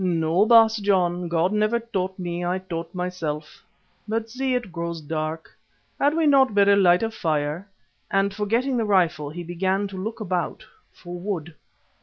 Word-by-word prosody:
"No, 170 +2 +2
Baas 225 -1 +6
John, 180 -4 +1
God 170 +3 +1
never 215 +2 +2
taught 190 -5 -3
me, 175 -1 -4
I 180 +1 0
taught 170 -3 -6
myself. 165 -5 -4 0.4
But, 225 +1 -2
see, 260 +1 -1
it 240 -7 -3
grows 170 -1 -4
dark. 155 +1 -4 0.5
Had 290 +2 +2
we 325 -1 +2
not 270 -6 +4
better 200 0 +5
light 180 -1 +4
a 225 - -1
fire," 155 0 -2 0.4
and 195 0 +1
forgetting 230 +6 0
the 230 - +1
rifle 175 -7 +2
he 175 +4 -7
began 190 +4 -1
to 195 - -8
look 220 +2 -5
about 180 -4 -3 0.3
for 175 0 -9
wood. 175 -4 -4
185 Hz, 165 wpm, -24 LUFS, 170-215 Hz, 0.5 s, Baas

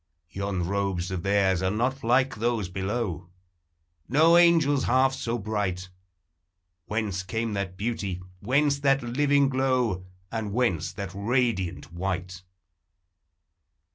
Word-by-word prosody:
Yon 95 -3 -2
robes 95 -2 -1
of 95 -2 -2
theirs 95 -2 +2
are 95 - +1
not 125 +6 -1
like 125 +4 +3
those 115 -4 -1
below; 95 -2 -3 0.8
No 160 +6 +5
angel's 165 -5 +4
half 130 +2 +3
so 120 -2 -2
bright; 100 -4 -3 1.0
Whence 105 -3 -2
came 110 +3 -3
that 100 -2 -3
beauty, 100 -4 -3 0.2
whence 140 +4 +2
that 135 -2 +2
living 140 +3 +2
glow, 130 -8 0 0.2
And 110 -3 -3
whence 115 -9 0
that 100 -3 -5
radiant 100 -6 -1
white? 90 0 -4
105 Hz, 115 wpm, -26 LUFS, 95-130 Hz, 1.0 s, No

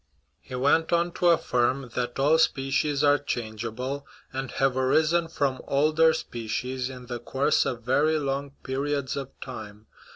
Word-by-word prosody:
He 130 - -9
went 145 +5 +2
on 170 0 +2
to 175 - 0
affirm 130 -5 +1
that 120 -1 -2
all 150 +4 +4
species 140 0 +1
are 145 0 +5
changeable, 120 +2 -4 0.3
and 135 0 -3
have 135 -1 +1
arisen 155 +6 +2
from 140 -5 -1
older 155 +3 +4
species 125 +3 -3
in 125 -1 -9
the 120 -1 -5
course 140 +5 +1
of 120 -3 -4
very 145 +6 +2
long 140 -1 -2
periods 140 0 -2
of 135 -2 -4
time. 110 -4 -8
135 Hz, 150 wpm, -26 LUFS, 125-145 Hz, 0.3 s, are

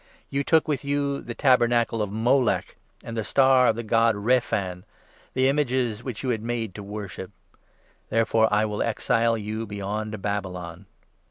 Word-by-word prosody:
You 140 +1 0
took 160 +2 +3
with 145 -3 -1
you 140 0 -1
the 120 - -7
tabernacle 120 -4 +3
of 105 -2 -2
Moloch 120 +3 +1 0.3
43 - - -17
And 115 - -5
the 110 - -1
Star 130 +1 +4
of 110 - +3
the 115 - -4
god 115 0 +3
Rephan 100 -5 0 0.2
— - - -30
The 130 0 +3
images 130 -5 0
which 125 -3 -5
you 130 - -1
had 115 -3 0
made 115 -3 -3
to 105 - -8
worship. 100 -2 -7 0.8
Therefore 110 0 +2
I 105 +1 +3
will 105 -1 -3
exile 115 0 +1
you 110 +1 -4
beyond 105 +1 -4
Babylon.' 95 -3 -4
115 Hz, 170 wpm, -25 LUFS, 105-125 Hz, 0.8 s, Star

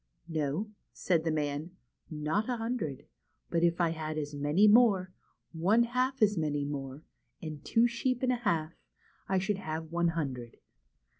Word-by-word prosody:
" - - -43
No," 160 +6 -2 0.2
said 170 -4 +1
the 165 - 0
man, 150 +2 -2 0.2
" - - -42
not 155 +9 -1
a 245 - 0
hundred; 225 - -3 0.5
but 170 - +1
if 170 0 +2
I 170 -2 +3
had 155 -1 -4
as 150 -1 -3
many 145 +8 +3
more, 205 -5 +5 0.4
one 195 +8 +3
half 255 +1 0
as 205 -4 +3
many 145 -2 -1
more, 140 0 -5 0.4
and 155 -2 -7
two 225 +10 +3
sheep 245 +2 -1
and 255 - +3
a 250 - +1
half, 170 -9 -1 0.6
I 190 - +2
should 195 +2 0
have 160 -2 -5
one 170 0 +2
hundred. 135 -8 -3
165 Hz, 170 wpm, -31 LUFS, 150-210 Hz, 0.6 s, more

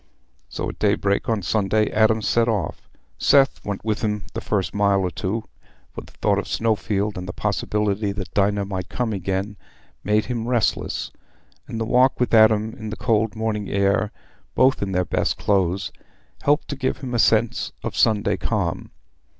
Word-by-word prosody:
So - - -4
at - - -9
daybreak, 100 0 +1
on 110 -4 0
Sunday, 105 +2 +1
Adam 110 0 +3
set 115 +2 +2
off. 105 -4 -3 0.3
Seth 140 -1 +4
went 100 0 -5
with 110 -1 -1
him 105 -2 -1
the 115 - -4
first 100 -4 -1
mile 100 -1 +2
or 90 -1 -1
two, 105 +6 -3 0.5
for - - -6
the - - -16
thought 100 -1 +1
of 100 - -5
Snowfield 105 -2 -1
and 90 - -7
the - - -4
possibility 105 -1 -1
that 95 -3 -6
Dinah 100 0 +1
might 95 -3 -5
come 120 -3 -2
again 95 +2 -3 0.5
made 105 +1 +2
him 120 -2 -3
restless, 120 -3 0 0.6
and 115 - -5
the 115 - -1
walk 125 +3 +3
with 125 - 0
Adam 110 0 +5
in 110 - -7
the 110 - -4
cold 110 -1 0
morning 110 -2 -2
air, 100 +1 +1 0.4
both 130 +2 +3
in 100 -1 -2
their 90 -1 +1
best - - -1
clothes, 95 -2 0 0.5
helped 145 +2 +2
to 145 - -3
give 130 -1 -1
him 130 -2 -5
a 120 - +1
sense 110 +3 +2
of - - -4
Sunday 105 -2 +2
calm. - - -2
105 Hz, 175 wpm, -22 LUFS, 100-110 Hz, 0.6 s, Adam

